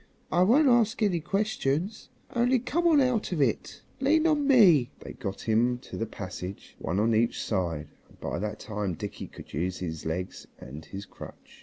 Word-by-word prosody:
I 175 - +3
won't 255 +11 +5
ask 235 -2 +3
any 185 -5 +2
questions, 190 0 -1 0.3
only 245 +2 +3
come 305 +8 0
along 300 -5 +5
out 245 -6 0
of 175 - -1
it. 130 -6 -1 0.2
Lean 310 +4 +3
on 300 -3 +2
me." 180 - +6
They - - -8
got 100 -2 -5
him 115 +3 +2
up 125 - -13
to - - -9
the 115 - -2
passage, 95 -2 -7
one 90 +4 -1
on 115 +2 +2
each 115 +2 +2
side, 85 -7 -2 0.2
and - - -22
by - - -3
that 105 +2 -4
time 105 -5 -3
Dickie 100 +5 -6
could - - -13
use 90 +5 -2
his 80 -3 -5
legs 90 +3 -4
and 75 +4 -10
his 100 +4 -8
crutch. - - -13
125 Hz, 190 wpm, -28 LUFS, -, 0.3 s, me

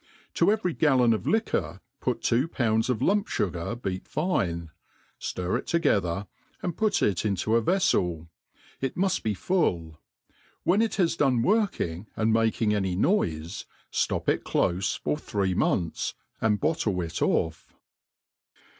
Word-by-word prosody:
To - - +3
every 210 -6 0
gallon 130 -7 +4
of 110 - -3
liquor 95 - 0 0.2
put - - -2
two 125 +6 +2
pounds 110 -6 0
of 125 -1 0
lump*fugar 115 - 0
beat 95 -5 -4
fine, 85 - -1 0.5
ftir 90 +6 -2
it - - -10
together, 100 - +1 0.4
and 175 -3 -2
put 215 -2 +1
it 95 -4 +1
into 105 +1 0
a 115 - +4
▼eflel; 90 - +1 0.5
it 135 -1 -2
muft 190 0 +1
be 110 -2 -1
full: 85 - 0 0.6
when 195 +5 +3
it 225 - 0
has 175 -4 +2
done 130 -7 +2
working 120 - 0
and 110 0 +2
making 110 -1 +2
any 95 -3 0
noife, 85 - 0 0.3
ftop - - 0
it - - +1
clofe 90 +2 0
for 150 - -1
three 100 -9 -1
months, 85 -2 0 0.3
and 105 -2 +2
bottle 110 - 0
it 85 -1 -4
off. 80 -1 0
110 Hz, 140 wpm, -27 LUFS, -, 0.6 s, gallon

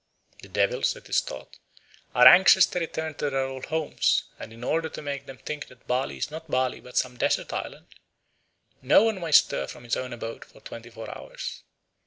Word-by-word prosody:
The - - -12
devils, - - +1
it - - -14
is - - +3
thought, 65 - -10 0.6
are 125 +1 +7
anxious 190 +5 +8
to 180 - -3
return 160 -1 -4
to 145 0 -2
their 135 -1 0
old 130 -1 -6
homes, 160 -1 +1 0.2
and 110 - -8
in 115 +1 -11
order 160 +5 0
to - - -8
make 140 -1 -5
them 135 - -10
think 150 -1 -6
that 125 -1 -19
Bali 130 +2 -1
is - - -3
not 160 +1 -8
Bali 130 -2 0
but 125 - -9
some 125 -1 0
desert - - 0
island, - - -6 1.0
no 135 +10 +5
one 220 -4 0
may 165 -2 -4
stir 70 - +4
from 120 - -10
his 120 - -1
own 130 0 -4
abode 115 -1 -6
for - - -19
twenty 115 0 -10
four 115 -2 -8
hours. - - -8
135 Hz, 205 wpm, -26 LUFS, 125-160 Hz, 1.0 s, anxious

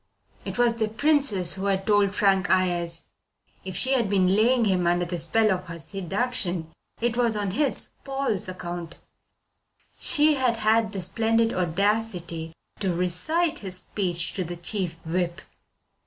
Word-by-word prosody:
It 195 - -5
was 240 -1 +3
the 220 -2 +1
Princess 225 - +1
who 195 +1 -4
had 195 -1 0
told 205 -2 +3
Frank 195 -2 +2
Ayres. 175 -3 +1 0.6
If 190 -1 -6
she 260 +8 +2
had 240 -6 +2
been 190 -1 +3
laying 235 +3 +3
him 185 -3 +1
under 175 0 +2
the 175 0 -4
spell 215 +7 +2
of 185 -1 -2
her 170 -1 -7
seduction 185 0 -1 0.3
it 235 0 0
was 235 -2 +2
on 200 -2 -1
his, 280 +6 0
Paul's, 270 -9 -2
account. 175 -2 -6 1.0
She 305 -1 +4
had 255 -4 +1
had 220 0 +2
the 195 -3 -3
splendid 225 +3 +1
audacity 180 -2 -1 0.3
to 195 -3 0
recite 300 - 0
his 185 -3 -5
speech 175 -3 -2
to 185 - -2
the 175 +1 -5
Chief 175 0 -2
Whip. 175 +1 -1
195 Hz, 155 wpm, -25 LUFS, 175-225 Hz, 1.0 s, She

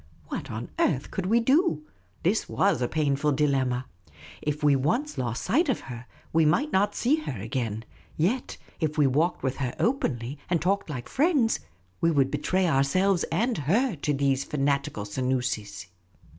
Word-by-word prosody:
What - - -4
on 115 +2 -6
earth 140 -4 +1
could 190 -1 -3
we 230 +4 +4
do? 260 - +2 0.4
This 195 +6 +1
was 200 -8 +2
a 120 - +1
painful 150 -1 +1
dilemma. 130 -3 +1 0.6
If 150 0 -3
we 145 -1 +5
once 230 - 0
lost 120 -2 -2
sight 315 +6 +2
of 260 - 0
her, 125 -1 -9 0.3
we 165 0 +4
might 270 - +2
not 200 +2 +2
see 270 +6 +2
her 140 - -5
again. 115 0 -3 0.3
Yet 215 +11 0 0.2
if 155 -1 -1
we 150 - +5
walked 150 +7 +1
with 130 -1 -1
her 130 -3 -3
openly, 140 - -1
and 175 -2 +2
talked 195 +2 0
like 130 -5 -5
friends, 280 -6 +2 0.4
we 165 - +4
would 140 -4 +2
betraj' 185 +5 +1
ourselves, 170 +6 +2
and 230 +9 +1
her, 205 - +1
to 150 - -1
those 140 -1 +1
fanatical 140 -7 -1
Senoosis. 125 -3 -2
150 Hz, 165 wpm, -27 LUFS, 130-195 Hz, 0.6 s, we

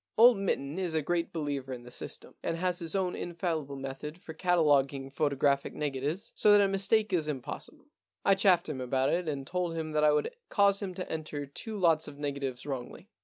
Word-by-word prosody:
Old 240 +2 +8
Mitten 170 -5 -1
is 175 -4 -1
a 160 - +2
great 170 +2 0
believer 145 -4 -3
in 120 -1 -7
system, - - -6
and 165 - -2
has 180 0 0
his 165 +2 -2
own 185 -2 0
infallible 165 -5 -3
method 135 +4 -6
for 170 -4 -9
cataloguing 145 -6 +2
photographic 140 -1 +1
negatives 145 +5 -2
so 210 - +4
that 205 - +8
a 200 - +5
mistake 200 +3 +1
is 160 -4 +1
impossible. 135 -5 -6 0.4
I 195 - +6
chaffed 190 -3 +4
him 140 -4 -4
about 130 +2 +1
it 175 -1 0
and 140 -2 -3
told 175 +1 -2
him 160 -1 -3
that 150 0 +1
I 150 - +6
would 150 - +1 0.2
cause 200 -1 +3
him 190 -3 -4
to 185 - -5
enter 155 -2 -4
two 210 +10 -7
lots 165 -4 +3
of 140 - -9
negatives 140 -3 -3
wrongly. 135 -4 -6
155 Hz, 200 wpm, -30 LUFS, 140-180 Hz, 0.4 s, Old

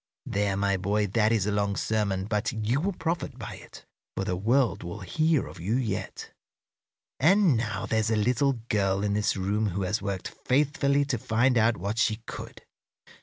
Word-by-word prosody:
There, 100 -1 0
my 100 -1 +1
boy, 100 +3 0
that 105 +2 +2
is 110 -5 +2
a 105 - 0
long 100 -1 0
sermon, 100 -4 -1
but 105 0 -1
you 115 +5 -1
will 200 +3 -1
profit 165 0 -3
by - - -7
it, - - -14 0.3
for - - 0
the 90 - -1
world 120 +7 +1
will 85 +4 -7
hear 155 - +1
of - - -11
you 100 +7 -1
yet. 115 -7 -3 0.9
"And 175 0 +5
now 115 -1 -2
there's 110 -1 0
a 110 - +2
little 125 +6 +2 0.2
girl 100 -1 +1
in 100 -1 0
this 105 -1 +1
room 105 +3 0
who 95 +2 -2
has 105 +4 -1
worked 100 -2 -3
faithfully 140 +1 +1
to 130 -5 -2
find 120 +4 +2
out 115 0 +3
what 100 +6 -3
she 110 -1 +3
could. - - -8
110 Hz, 185 wpm, -27 LUFS, 100-125 Hz, 0.9 s, And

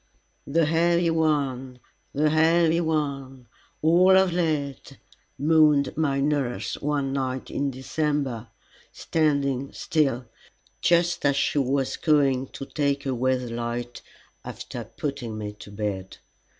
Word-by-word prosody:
"The 165 +3 +2
heavy 170 +2 +2
one, 140 -5 0 0.3
the 150 +1 +1
heavy 165 +1 +3
one 140 -5 -2 0.4
all 180 +4 +6
of 190 -2 +3
lead," 150 -5 -2 0.4
moaned 150 -2 +3
my 145 -3 0
nurse, 140 -4 -1
one 140 -2 -1
night 130 -1 -3
in 140 0 -1
December, 135 -3 -2 0.4
standing 140 -4 0
still, 135 -6 0 0.6
just 175 0 +2
as 140 -1 +3
she 140 +1 +1
was 135 0 0
going 135 -4 +2
to 135 - -8
take 140 -1 -1
away 130 0 +1
the 125 -2 -5
light 120 +1 -4 0.4
after - - -7
putting 140 -8 -5
me 105 -1 -5
to - - -11
bed. 100 -2 -4
140 Hz, 120 wpm, -25 LUFS, 130-155 Hz, 0.6 s, all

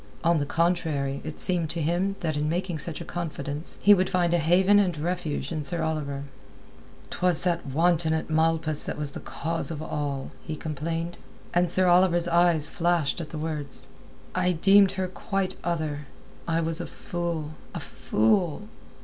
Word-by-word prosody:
On 170 -1 +3
the 145 - -2
contrary, 160 -5 0
it 155 0 -7
seemed 175 -4 +1
to 170 - -3
him 175 +5 0
that 160 -4 -1
in 150 +1 0
making 175 -1 -2
such 165 +2 -5
a - - -6
confidence, 155 -3 -5
he 205 - +8
would 185 -1 +2
find 175 -2 +1
a 175 - +3
haven 185 +6 +4
and 180 -5 +1
refuge 165 -1 -3
in 155 -2 -2
Sir 165 +3 -2
Oliver. 145 -3 -2 0.9
"'Twas 180 -3 +4
that 170 -3 0
wanton 160 +3 +2
at 160 0 -1
Malpas 160 -1 +1
was 150 -1 -2
the - - -7
cause 165 +1 -2
of 160 -3 -4
all," 145 -3 -3
he 155 - -5
complained. 165 +3 -4 0.3
And 175 0 +2
Sir 185 +2 +4
Oliver's 175 -1 +4
eye 175 0 +4
flashed 165 0 +1
at 155 - -7
the 155 - -6
words. 150 -3 -5 0.4
"I 180 0 +1
deemed 195 +3 +5
her 190 -1 -2
quite 190 +1 -3
other; 155 -4 -2 0.4
I 165 0 +1
was 165 +1 0
a - - -5
fool, 170 -3 -4 0.2
a - - -2
fool! 155 - 0
165 Hz, 170 wpm, -26 LUFS, 155-175 Hz, 0.9 s, he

